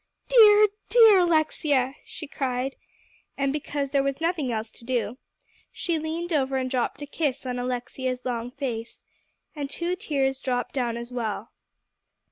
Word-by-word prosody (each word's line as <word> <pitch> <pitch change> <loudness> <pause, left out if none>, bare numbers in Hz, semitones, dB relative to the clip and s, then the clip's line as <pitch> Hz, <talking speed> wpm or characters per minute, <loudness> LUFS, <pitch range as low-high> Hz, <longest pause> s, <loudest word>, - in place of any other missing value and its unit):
"Dear, 425 -3 +8 0.2
dear 445 -5 +7
Alexia," 310 -6 +2
she 315 - -8
cried; 265 -2 -2 0.6
and 275 0 0
because 285 -2 -3
there 280 -1 +3
was 275 0 -2
nothing 325 -6 0
else 220 0 -3
to - - -18
do, 240 -1 -2 0.5
she 335 -3 -2
leaned 330 +2 -3
over 270 -2 +1
and 255 -1 -2
dropped 255 +2 -1
a - - -4
kiss 285 -2 -2
on 250 -1 -2
Alexia's 250 +1 -3
long 240 -1 -2
face, 245 -4 -5 0.5
and 285 -2 -4
two 345 +4 -2
tears 275 -9 -1
dropped 245 -2 -2
down 240 -3 -1
as 235 +1 -7
well. 225 -2 -3
270 Hz, 150 wpm, -26 LUFS, 250-310 Hz, 0.6 s, Dear